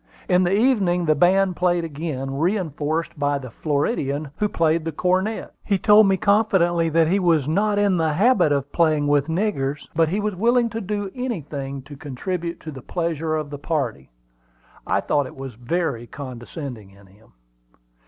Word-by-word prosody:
In 180 0 +4
the 185 +3 +2
evening 200 -8 +2
the 155 - +4
band 185 +4 +3
played 175 -1 +1
again, 140 -4 -4
reinforced 165 -3 -1
by 145 0 +1
the 130 -3 -8
Floridian, 145 - -1
who 210 - 0
played 165 -2 +1
the 165 - -3
cornet. 185 +7 -1
He 200 - +1
told 210 +2 +6
me 195 -1 +3
confidentially 190 -5 +2
that 165 0 +3
he 190 +5 +2
was 165 -7 +2
not 205 +6 +1
in 200 -3 +3
the 160 -2 +1
habit 195 -3 +3
of 140 0 -1
playing 155 -3 +2
with 145 0 +2
"niggers," 160 -6 -1
but 165 -1 +3
he 195 +5 -1
was 210 0 -1
willing 235 +4 +2
to 225 0 -4
do 205 -1 -3
anything 145 - -5
to 145 +1 -11
contribute 170 +6 -4
to 155 - -7
the 135 -3 -9
pleasure 165 0 -2
of 155 -2 -4
the 145 - -6
party. 140 - -3 0.8
I - - +1
thought 145 -3 0
it - - -12
was 135 -1 -7
very 120 0 -2
condescending 125 -4 -8
in 100 +1 -19
him. 100 +4 -23
165 Hz, 175 wpm, -22 LUFS, 145-190 Hz, 0.8 s, told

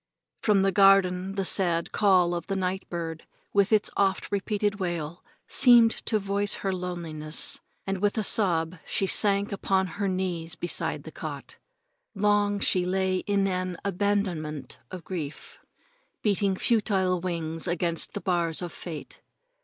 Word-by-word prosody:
From 205 -3 +3
the 195 - +3
garden 195 -1 +4
the 195 -1 -1
sad 175 -3 +2
call 185 -4 +3
of 170 +1 -5
a 195 - 0
night 190 0 -2
bird, 165 -2 -5 0.3
with 200 0 +3
its 215 -1 +3
oft 195 0 0
repeated 205 0 -1
wail, 175 -2 -4 0.2
seemed 240 -3 +6 0.2
to 220 - +2
voice 200 0 0
her 195 - +1
loneliness, 170 -4 -4 0.3
and 195 -1 -2
with 205 +3 0
a 220 - +1
sob 175 -5 +1
she 195 - -1
sank 200 +1 +3
upon 190 -1 +1 0.2
her 200 - +1
knees 180 -3 -2
beside 175 - -3
the - - -9
cot. - - -8 0.6
Long 205 0 +2
she 185 -2 +2
lay 185 +1 0
in 200 -1 +2
an 185 -2 -2
abandonment 180 -8 -2
of 185 -2 -8
grief, 160 -5 -7 0.6
beating 200 -2 +1
futile 190 -4 +1
wings 165 -2 -2
against 170 -1 0
the 205 - -3
bars 170 -2 0
of 175 - -6
fate. 160 -4 -8
190 Hz, 145 wpm, -27 LUFS, 175-200 Hz, 0.6 s, seemed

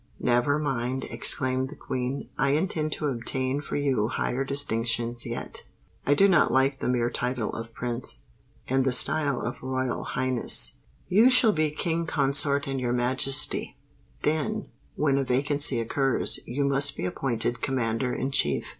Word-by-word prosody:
"Never 125 +4 +1
mind," 130 -3 -2
exclaimed 130 -1 +1
the 150 - -10
Queen. 130 +2 -4
"I 135 0 +1
intend 155 -1 -1
to 150 - -4
obtain 130 +1 -2
for - - -6
you 135 -7 0
higher 130 +2 -2
distinctions 120 -3 0
yet. - - -6 0.4
I 145 - +4
do 195 +7 +5
not 175 -5 +3
like 135 +2 +1
the - - -2
mere 120 -1 0
title 125 -3 -2
of 115 0 -7
Prince, 120 - -3 0.4
and 135 +1 +1
the 130 -1 +1
style 140 +1 +3
of 120 - -5
Royal 130 -1 -3
Highness: 130 -2 +1 0.3
you 220 +7 +5
shall 250 -3 +6
be 155 -5 0
King 165 +2 -2
Consort 140 -1 +2
and 135 -1 -3
Your 120 -1 -1
Majesty. 130 +3 +1 0.5
Then, 215 +8 -1 0.3
when 140 -2 +1
a - - 0
vacancy 140 +1 +2
occurs, 135 +3 0
you 135 +4 -2
must 140 +1 +2
be - - -3
appointed 120 +4 -2
Commander 125 -1 -1
in 130 +2 -3
Chief." 75 - +2
135 Hz, 155 wpm, -26 LUFS, 125-145 Hz, 0.5 s, shall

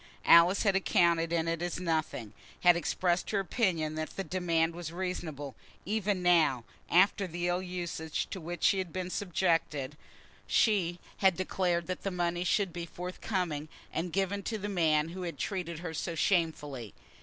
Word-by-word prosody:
Alice 170 +3 +7
had 200 -3 +3
accounted 170 -3 +3
it 165 0 0
as 175 0 -2
nothing, 155 - -2 0.3
had 175 -1 +7
expressed 175 +1 0
her 205 - +1
opinion 180 -6 0
that 155 0 -3
the 195 - -2
demand 170 -3 0
was 170 -2 -6
reasonable; 165 -6 -4 0.3
even 205 -2 0
now, 160 -9 +4 0.3
after 195 +2 +4
the 175 +1 -3
ill 175 +1 +1
usage 175 -4 -3
to 190 - -5
which 175 +2 -6
she 195 - +4
had 185 -3 -3
been 185 +1 -4
subjected, 165 -7 0 0.5
she 180 -6 +2 0.2
had 190 -3 +3
declared 180 -2 0
that 185 +1 -4
the 195 - -2
money 175 -1 -1
should 190 -1 +1
be 170 0 -5
forthcoming, 180 -3 -3 0.2
and 170 +2 -2
given 195 +2 0
to 220 +3 -3
the 205 0 -4
man 160 -5 +2
who 185 +2 -7
had 175 -2 -4
treated 180 -5 -3
her 165 0 -5
so 165 +1 -3
shamefully. 150 - 0
175 Hz, 165 wpm, -31 LUFS, 165-185 Hz, 0.5 s, Alice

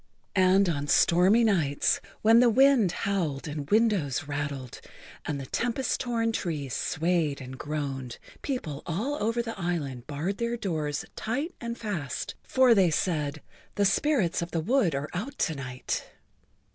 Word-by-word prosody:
And 190 +1 +5
on 145 -4 -1
stormy 185 +10 +5
nights, 165 -10 +2 0.2
when 225 +2 +7
the 245 0 +6
wind 255 -5 +5
howled 170 -8 -2
and 145 -1 -5
windows 205 - +2
rattled 145 -3 -4 0.4
and 145 - -2
the 135 - -6
tempest 245 - -1
torn 230 -2 0
trees 150 - -3
swayed 160 -2 0
and 130 -1 -8
groaned, 135 -4 -4 0.2
people 165 - -4
all 225 - -2
over 230 +3 0
the 225 -3 -6
island 145 -9 -3
barred 155 +7 -3
their 235 0 -1
doors 155 -9 -2
tight 280 +10 -2
and 235 0 -4
fast, 170 - -4
for 260 -2 +4
they 190 -5 +4
said: 155 -3 -1 0.3
"The 205 - +2
spirits 205 - +2
of 170 - -3
the 165 - -1
wood 195 - +2
are 140 +2 -2
out 245 +11 -4
to 165 - 0
night." 130 -3 -4
175 Hz, 150 wpm, -28 LUFS, 145-230 Hz, 0.4 s, when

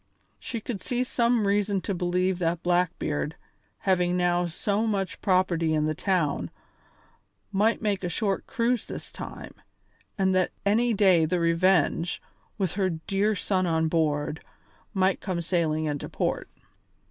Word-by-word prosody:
She 235 - -4
could 210 -3 -5
see 245 0 -1
some 235 -3 +1
reason 200 0 +1
to 195 - -2
believe 180 +1 0
that 170 -1 -1
Blackbeard, 175 -3 0 0.5
having 180 -2 +2
now 175 0 +2
so 205 +6 -1
much 195 -3 -2
property 175 -4 +2
in 150 0 +1
the 155 - 0
town, 155 - 0 1.0
might 215 +4 +2
make 200 -3 0
a 180 - -1
short 195 +2 -1
cruise 235 0 0
this - - -7
time, - - -8 0.6
and 190 -1 +2
that 185 -1 +1
any 225 +3 +3
day 185 -5 +5
the 175 +3 0
Revenge, 170 0 +2 0.4
with 190 -5 0
her 190 -1 0
dear 195 +6 0
son 185 0 0
on 160 -1 +1
board, 150 -1 0 0.5
might 190 -2 +1
come 185 -4 -2
sailing 160 -3 0
into 145 -2 -3
port. - - -2
185 Hz, 145 wpm, -27 LUFS, 165-200 Hz, 1.0 s, day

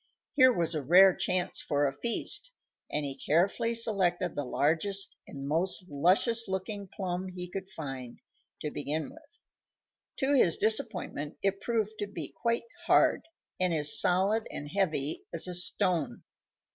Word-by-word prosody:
Here 260 -3 +6
was 170 -7 0
a 155 - -2
rare 180 +6 +6
chance 185 0 0
for 145 0 0
a 135 - 0
feast, 235 - 0 0.4
and 150 0 -1
he 135 -1 -4
carefully 195 +11 +1
selected 185 -6 +1
the 145 - -3
largest 195 +9 0
and 140 -1 -7
most 180 +4 0
luscious 195 - +2
looking 195 +1 -4
plum 185 -1 -4
he 180 -1 -6
could 190 +1 -7
find, 135 -8 -7 0.5
to 150 - -3
begin 150 - -3
with. 315 +8 -19 0.8
To 270 +2 +1
his 185 - +4
disappointment 185 -8 -1
it 195 0 0
proved 220 -2 -2
to 205 - -2
be 200 - -6
quite 235 0 -1 0.2
hard, - - +3 0.3
and 185 -1 +1
as 150 -1 +3
solid 195 +5 +3
and 145 - -7
heavy 160 -7 -1
as 165 - 0
a 180 - -4
stone. 175 -2 -1
185 Hz, 150 wpm, -29 LUFS, 155-205 Hz, 0.8 s, Here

